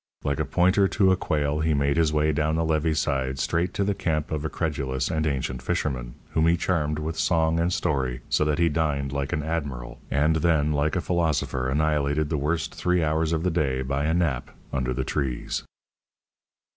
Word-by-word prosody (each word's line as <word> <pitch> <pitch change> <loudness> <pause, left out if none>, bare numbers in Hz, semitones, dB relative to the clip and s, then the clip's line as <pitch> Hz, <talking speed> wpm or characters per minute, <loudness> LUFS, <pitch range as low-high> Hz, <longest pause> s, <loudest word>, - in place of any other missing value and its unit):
Like 70 0 -1
a 75 - +1
pointer 95 +7 +3
to 95 -1 +3
a - - +5
quail, 75 -4 -1
he 80 -1 +1
made 70 0 +1
his 80 -2 +3
way 75 0 +2
down 75 +1 0
the 80 0 +1
levee 80 0 +1
side 65 -3 0
straight 85 +6 0
to 100 - +1
the 100 +1 +1
camp 80 -5 -2
of 75 -2 -2
a 80 - -1
credulous 70 -6 -2
and 80 -1 0
ancient 65 -3 -2
fisherman, 60 -2 -2 0.2
whom 80 0 +2
he 85 +1 +4
charmed 75 -4 0
with 80 +1 -4
song 80 -1 +2
and 85 +2 +1
story, 65 -8 -1
so - - +2
that 75 -1 +1
he 85 - +3
dined 75 -3 0
like 70 -1 -2
an 75 - -1
admiral, 70 -7 -4
and 75 +3 +2
then 80 -2 +2
like 75 +1 +1
a 90 - +1
philosopher 75 -7 0
annihilated 75 0 +1
the 80 - 0
worst 75 +1 -1
three 90 -1 +1
hours 80 +1 +1
of 80 0 0
the 90 - +1
day 70 -6 0
by 70 +2 -1
a 80 - +1
nap 80 -8 0 0.2
under 65 -2 0
the 65 +1 -1
trees. 65 -4 -2
75 Hz, 205 wpm, -25 LUFS, 70-80 Hz, 0.2 s, a